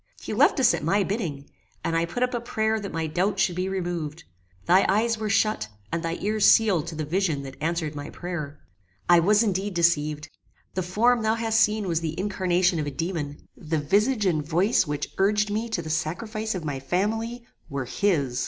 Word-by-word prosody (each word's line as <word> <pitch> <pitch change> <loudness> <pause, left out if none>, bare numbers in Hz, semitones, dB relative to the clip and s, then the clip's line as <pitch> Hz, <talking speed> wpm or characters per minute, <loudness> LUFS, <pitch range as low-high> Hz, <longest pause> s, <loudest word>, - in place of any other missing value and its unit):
He - - -6
left - - +4
us 255 -2 +5
at - - -3
my 195 +6 +2
bidding, 170 - -3 0.4
and 165 - -1
I 165 0 +2
put 175 +9 -2
up 250 - 0
a 240 - -1
prayer 220 -2 0
that 200 -1 -6
my 165 0 -2
doubts 180 +6 +1
should 175 - 0
be 185 +1 -1
removed. 175 -4 -3 0.4
Thy 185 +2 +5
eyes 225 +3 +2
were 215 -1 -2
shut, 205 - +1 0.2
and 165 - -1
thy 165 0 -2
ears 215 +1 +3
sealed 195 -8 +3
to 165 - -6
the 155 0 -3
vision 160 -3 0
that 135 -1 -8
answered 160 -1 -1
my 145 0 -6
prayer. 155 -5 -6 0.5
"I 175 0 +7
was 205 +6 +4
indeed 195 -2 -1
deceived. 150 -3 +1 0.5
The 185 - -1
form 225 +7 +2
thou 220 +1 +2
hast 225 -1 +1
seen 210 -1 +2
was 165 -2 0
the 160 +1 -4
incarnation 185 -3 +1
of 150 - -2
a - - 0
daemon. 150 0 -4
The 160 0 -3
visage 210 - +1
and 160 -5 +1
voice 175 +5 +2
which 145 0 -4
urged 210 +2 +2
me 220 +3 -2
to 175 -6 -2
the 155 - -7
sacrifice 215 +8 -2
of 175 -4 -5
my 140 -3 -3
family, 225 - -2 0.2
were 140 -2 -3
his. 140 -5 0
180 Hz, 205 wpm, -25 LUFS, 155-210 Hz, 0.5 s, I